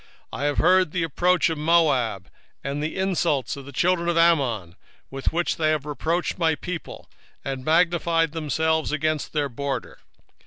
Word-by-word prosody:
2:8 -, -, -5 dB
I -, -, -3 dB
have 145 Hz, -1 st, 0 dB
heard 185 Hz, -1 st, +4 dB
the 175 Hz, 0 st, -1 dB
reproach 175 Hz, +2 st, +2 dB
of 160 Hz, -, -4 dB
Moab, 145 Hz, -, +2 dB, 0.4 s
and 140 Hz, +1 st, -3 dB
the 155 Hz, +1 st, -3 dB
revilings 170 Hz, -9 st, 0 dB
of 140 Hz, -1 st, -10 dB
the 140 Hz, -, -9 dB
children 170 Hz, +4 st, +1 dB
of 170 Hz, -, 0 dB
Ammon, 130 Hz, -, +2 dB, 0.3 s
whereby 135 Hz, +6 st, -1 dB
they 155 Hz, -1 st, +1 dB
have 155 Hz, -2 st, 0 dB
reproached 165 Hz, +5 st, -2 dB
my 160 Hz, -2 st, +2 dB
people, 180 Hz, +2 st, -7 dB, 0.4 s
and 135 Hz, -1 st, -4 dB
magnified 165 Hz, 0 st, +2 dB
themselves 160 Hz, 0 st, 0 dB
against 155 Hz, 0 st, -1 dB
their 145 Hz, -2 st, 0 dB
border. 140 Hz, +2 st, -5 dB
155 Hz, 160 wpm, -24 LUFS, 140-170 Hz, 0.4 s, heard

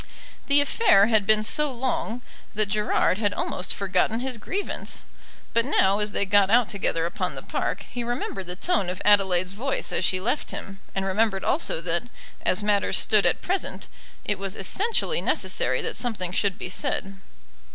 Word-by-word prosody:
The 285 Hz, 0 st, +5 dB
affair 285 Hz, -, +4 dB
had 210 Hz, -3 st, +3 dB
been 215 Hz, 0 st, +4 dB
so 295 Hz, +6 st, +2 dB
long 245 Hz, -1 st, -3 dB, 0.3 s
that 210 Hz, -1 st, +1 dB
Gerard 210 Hz, -2 st, +1 dB
had 205 Hz, -2 st, 0 dB
almost 180 Hz, -, -2 dB
forgotten 195 Hz, +3 st, 0 dB
his 255 Hz, -2 st, -3 dB
grievance. 400 Hz, -, -4 dB, 0.5 s
But 230 Hz, -, +3 dB
now 200 Hz, -7 st, +2 dB
as 210 Hz, 0 st, 0 dB
they 200 Hz, -, +1 dB
got 200 Hz, 0 st, +4 dB
out 235 Hz, +1 st, +4 dB
together 175 Hz, -5 st, -1 dB
upon 175 Hz, -2 st, -3 dB
the 135 Hz, -, -7 dB
park, -, -, -3 dB
he 245 Hz, 0 st, -5 dB
remembered 235 Hz, -6 st, -4 dB
the 180 Hz, -, -5 dB
tone 200 Hz, -, 0 dB
of 180 Hz, -, -5 dB
Adelaide's 190 Hz, -3 st, +3 dB
voice 260 Hz, +7 st, -2 dB
as -, -, 0 dB
she 185 Hz, +1 st, +3 dB
left 245 Hz, +10 st, -2 dB
him, 195 Hz, 0 st, -7 dB, 0.2 s
and 195 Hz, 0 st, -1 dB
remembered 195 Hz, 0 st, 0 dB
also 275 Hz, -, 0 dB
that, 170 Hz, +4 st, -1 dB, 0.4 s
as 205 Hz, -, +1 dB
matters 205 Hz, -1 st, +2 dB
stood 205 Hz, -4 st, +4 dB
at -, -, -1 dB
present, 375 Hz, +1 st, -3 dB, 0.4 s
it 205 Hz, -2 st, -1 dB
was 195 Hz, -1 st, -3 dB
essentially 450 Hz, -, +1 dB
necessary -, -, 0 dB
that -, -, -3 dB
something 200 Hz, -8 st, -2 dB
should 195 Hz, 0 st, 0 dB
be -, -, -5 dB
said. 195 Hz, 0 st, -2 dB
205 Hz, 175 wpm, -25 LUFS, 190-240 Hz, 0.5 s, The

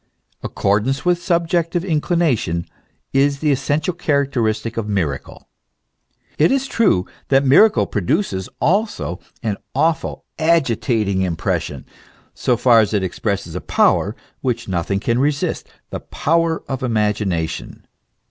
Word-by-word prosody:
* -, -, -42 dB
Accordance 110 Hz, -, 0 dB
with 175 Hz, -1 st, +2 dB
subjective 170 Hz, 0 st, 0 dB
inclination, 150 Hz, -, 0 dB, 0.5 s
is 140 Hz, +1 st, +3 dB
the 150 Hz, +1 st, +1 dB
essential 145 Hz, +6 st, 0 dB
characteristic 125 Hz, -9 st, 0 dB
of 110 Hz, -2 st, -3 dB
miracle. 80 Hz, -10 st, -3 dB, 0.9 s
It 155 Hz, -, +5 dB
is 270 Hz, 0 st, +1 dB
true 215 Hz, -, +2 dB, 0.2 s
that 135 Hz, 0 st, +3 dB
miracle 205 Hz, +11 st, +5 dB
produces 105 Hz, -, -1 dB
also 195 Hz, -, 0 dB, 0.2 s
an 105 Hz, -3 st, -1 dB, 0.2 s
awful, 165 Hz, 0 st, 0 dB
agitating 120 Hz, -, +1 dB
impression, 90 Hz, -3 st, -2 dB, 0.5 s
so 125 Hz, -, 0 dB
far 120 Hz, -1 st, +5 dB
as 110 Hz, -1 st, +2 dB
it 100 Hz, -, +1 dB
expresses 100 Hz, -1 st, -3 dB
a 90 Hz, -, -4 dB
power -, -, +2 dB, 0.3 s
which 120 Hz, -2 st, -2 dB
nothing 95 Hz, +1 st, -1 dB
can 115 Hz, +3 st, 0 dB
resist, 145 Hz, +1 st, -1 dB, 0.2 s
the -, -, -4 dB
power 165 Hz, +1 st, 0 dB
of 135 Hz, -2 st, -3 dB
the 130 Hz, -, -2 dB
imagination. 105 Hz, -7 st, -1 dB
130 Hz, 125 wpm, -20 LUFS, 105-165 Hz, 0.9 s, It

